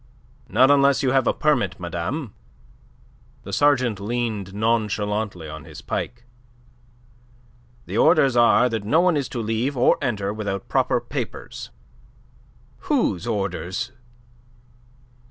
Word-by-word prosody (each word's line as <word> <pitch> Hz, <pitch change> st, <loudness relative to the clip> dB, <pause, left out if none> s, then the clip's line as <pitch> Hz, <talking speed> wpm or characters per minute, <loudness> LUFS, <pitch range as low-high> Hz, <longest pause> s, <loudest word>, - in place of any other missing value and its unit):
"Not 130 Hz, +6 st, +5 dB
unless 140 Hz, 0 st, +4 dB
you 130 Hz, -, +2 dB
have 135 Hz, -2 st, +2 dB
a -, -, +5 dB
permit, 120 Hz, -, 0 dB
madame." 90 Hz, -, -4 dB, 1.1 s
The -, -, -8 dB
sergeant 130 Hz, -7 st, +2 dB
leaned 110 Hz, -2 st, -3 dB
nonchalantly 105 Hz, -4 st, -1 dB
on 80 Hz, -1 st, -8 dB
his -, -, -11 dB
pike. 120 Hz, 0 st, -4 dB, 1.6 s
"The -, -, -2 dB
orders 140 Hz, -6 st, +4 dB
are 120 Hz, +1 st, +5 dB
that 115 Hz, -4 st, -3 dB
no 130 Hz, +11 st, +3 dB
one 180 Hz, -1 st, +3 dB
is 140 Hz, -3 st, -1 dB
to 120 Hz, -, -4 dB
leave 115 Hz, +5 st, -1 dB
or 125 Hz, -, +4 dB
enter 105 Hz, -7 st, -1 dB
without 100 Hz, -3 st, -4 dB
proper -, -, +1 dB
papers." -, -, -6 dB, 1.2 s
"Whose 95 Hz, +6 st, +1 dB
orders?" 95 Hz, +1 st, -3 dB
115 Hz, 120 wpm, -23 LUFS, 100-130 Hz, 1.6 s, Not